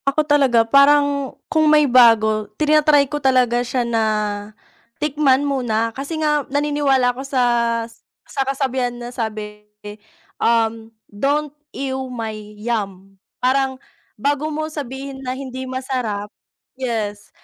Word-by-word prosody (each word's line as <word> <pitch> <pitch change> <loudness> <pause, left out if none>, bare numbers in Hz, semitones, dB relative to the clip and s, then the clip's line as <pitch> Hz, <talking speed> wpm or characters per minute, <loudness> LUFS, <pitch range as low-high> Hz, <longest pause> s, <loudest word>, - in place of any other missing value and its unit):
Ako 285 +2 +1
talaga, 270 -6 +3
parang, 280 +2 +3
kung 310 -1 +2
may 300 -1 +5
bago, 225 -4 +4
tina-try 300 -1 +4
ko 295 +2 -5
talaga 250 -3 +3
siya 245 0 -1
na, 230 -1 0 1.0
tikman 290 -2 +2
muna, 235 -5 0
kasi 280 +4 -4
nga 300 -1 +2
naniniwala 285 -3 +2
ako 255 - -7
sas 235 -3 0 0.3
sa 275 - -2
kasabihan 265 -2 -1
na 240 0 -7
sabi, 215 -3 -5 0.8
um, 225 -1 +1 0.2
"Don't 285 +8 0 0.2
ew 265 -1 -3
my 225 -2 -4 0.2
yum." 200 -3 -4 0.2
Parang, 265 +1 +1 0.4
bago 290 +6 0
mo 310 +1 -3
sabihin 275 -2 -7
na 255 - -2
hindi 260 -1 -6
masarap 250 -6 -3 0.5
yes, 220 -5 -3
260 Hz, 120 wpm, -20 LUFS, 230-285 Hz, 1.0 s, may